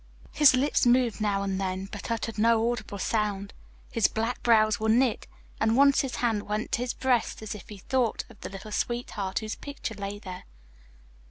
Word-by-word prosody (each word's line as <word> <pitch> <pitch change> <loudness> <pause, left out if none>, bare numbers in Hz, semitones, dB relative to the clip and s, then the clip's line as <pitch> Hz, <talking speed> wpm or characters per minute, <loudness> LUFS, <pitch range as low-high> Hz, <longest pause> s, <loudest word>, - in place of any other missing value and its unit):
His 285 -4 +6
lips 270 +3 +2
moved 240 -3 +3
now 200 -2 +1
and 195 -1 -2
then 190 0 -2
but 205 - -7
uttered 225 -1 -3
no 230 +1 +3
audible 215 -4 -5
sound, 200 -1 -1 0.4
his 230 -3 +3
black 225 +3 -2
brows 215 -3 +4
were 220 0 0
knit, 240 +1 +2 0.3
and 220 +2 +2
once 280 0 +6
his 270 - -4
hand 225 -4 0
went 210 +2 -2
to 235 - 0
his 245 0 -2
breast 245 -4 0
as 215 - -4
if 210 +2 -11
he 210 - -8
thought 245 +3 0
of - - -18
the - - -6
little 195 +2 -9
sweetheart 210 -4 -2
whose 215 -1 -2
picture 280 -5 -6
lay 200 0 -5
there. 185 -3 -9
220 Hz, 190 wpm, -27 LUFS, 205-240 Hz, 0.4 s, His